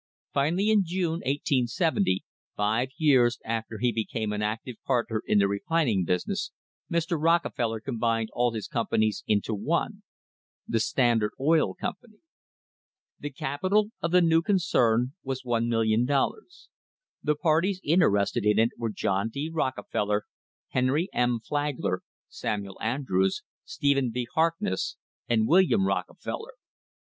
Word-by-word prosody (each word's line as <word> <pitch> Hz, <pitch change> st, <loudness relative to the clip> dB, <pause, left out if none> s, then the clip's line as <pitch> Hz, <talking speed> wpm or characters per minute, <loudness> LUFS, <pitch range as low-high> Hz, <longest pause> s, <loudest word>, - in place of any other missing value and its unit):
Finally, 175 Hz, +10 st, +2 dB
in 210 Hz, -2 st, +4 dB
June, 170 Hz, -2 st, -1 dB
1870, 130 Hz, -, +1 dB, 0.3 s
five 110 Hz, +5 st, +1 dB
years 130 Hz, -6 st, +4 dB
after 115 Hz, 0 st, -3 dB
he 120 Hz, +3 st, +1 dB
became 110 Hz, -1 st, -2 dB
an 105 Hz, -, -2 dB
active 110 Hz, +3 st, -3 dB
partner 115 Hz, -4 st, 0 dB
in -, -, +3 dB
the 100 Hz, -1 st, +4 dB
refining 105 Hz, -, +1 dB
business, 90 Hz, +1 st, -1 dB, 0.4 s
Mr. 170 Hz, -1 st, 0 dB
Rockefeller 145 Hz, -9 st, +1 dB
combined 115 Hz, -2 st, -1 dB
all 120 Hz, 0 st, +2 dB
his 110 Hz, -3 st, -5 dB
companies 110 Hz, -2 st, 0 dB
into 105 Hz, +1 st, +1 dB
one 100 Hz, -, -1 dB, 0.3 s
— -, -, -62 dB
the 115 Hz, -, +1 dB
Standard 115 Hz, -2 st, +2 dB
Oil 155 Hz, +4 st, +2 dB
Company. 215 Hz, +2 st, -6 dB, 1.0 s
The 145 Hz, -, -4 dB
capi 145 Hz, +5 st, -3 dB
tal 210 Hz, +1 st, +3 dB
of 170 Hz, -, 0 dB
the 180 Hz, +1 st, +4 dB
new 165 Hz, 0 st, +4 dB
concern 130 Hz, -, +2 dB
was 130 Hz, -1 st, -4 dB
$1,000,000. 120 Hz, -, 0 dB, 0.5 s
The 150 Hz, 0 st, +1 dB
parties 165 Hz, +5 st, +1 dB
inter 165 Hz, +3 st, +4 dB
ested 100 Hz, 0 st, +1 dB
in 105 Hz, 0 st, +3 dB
it 115 Hz, +1 st, +3 dB
were 115 Hz, -1 st, -1 dB
John 100 Hz, +1 st, -1 dB
D. 145 Hz, +7 st, -4 dB
Rockefeller, 105 Hz, -8 st, -1 dB, 0.5 s
Henry 135 Hz, +8 st, +1 dB
M. 120 Hz, -1 st, +1 dB
Flag 145 Hz, +4 st, -2 dB
ler, 90 Hz, -, -1 dB, 0.3 s
Samuel 100 Hz, -2 st, -4 dB
Andrews, 110 Hz, -6 st, 0 dB, 0.2 s
Stephen 140 Hz, -3 st, +1 dB
V. 125 Hz, +1 st, -2 dB
Harkness, 160 Hz, -, 0 dB, 0.3 s
and 110 Hz, -2 st, +2 dB
William 190 Hz, +3 st, +4 dB
Rockefeller. 460 Hz, -, -3 dB
125 Hz, 135 wpm, -27 LUFS, 110-160 Hz, 1.0 s, in